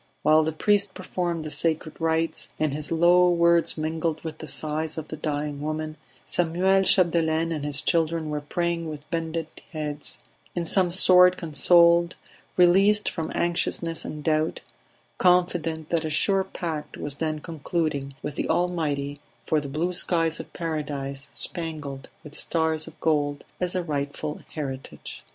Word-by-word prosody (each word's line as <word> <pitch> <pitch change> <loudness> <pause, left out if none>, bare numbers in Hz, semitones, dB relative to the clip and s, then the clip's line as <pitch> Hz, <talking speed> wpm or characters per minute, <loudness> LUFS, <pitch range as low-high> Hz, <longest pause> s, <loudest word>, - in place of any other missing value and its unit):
While 155 +1 +5
the 160 0 0
priest 200 +4 +1
performed 175 -3 -3
the 155 - -5
sacred 160 -1 0
rites, 165 0 0
and 155 -2 +1
his 150 +1 -1
low 175 +2 +5
words 170 -1 +3
mingled 160 0 -2
with 160 -2 -6
the 155 - -7
sighs 155 +1 -1
of 160 -1 -6
the - - -5
dying 145 -1 -3
woman, 155 +1 -3 0.3
Samuel 180 +3 +2
Chapdelaine 165 -3 +3
and 155 -3 -3
his 145 0 +2
children 165 -1 0
were 150 0 -2
praying 170 +2 -2
with 150 -1 -8
bended 165 -1 -2 0.3
heads; 150 -2 -3 0.3
in 175 -1 -1
some 185 +1 +3
sort 180 0 +6
consoled, 170 +2 +4 0.4
released 195 +4 +5
from 160 -1 -4
anxiousness 170 -1 -1
and 150 -1 -6
doubt, 155 +1 0 0.6
confident 175 -3 +2
that 170 -1 +1
a 160 - -2
sure 190 +5 +2
pact 160 -5 -5
was 145 -1 -2
then 155 0 -1
concluding 155 -3 -3
with 150 - -3
the - - -2
Almighty 145 -5 -1 0.3
for 155 -1 +1
the 140 - -7
blue 165 +6 -1
skies 165 -2 +1
of - - -8
Paradise 145 -4 -4
spangled 150 -6 -4
with 150 -2 -11
stars 160 -1 -1
of - - -13
gold 145 -2 0 0.2
as 180 0 -2
a 180 - 0
rightful 145 -1 -4
heritage. 135 -4 -6
160 Hz, 150 wpm, -25 LUFS, 150-170 Hz, 0.6 s, sort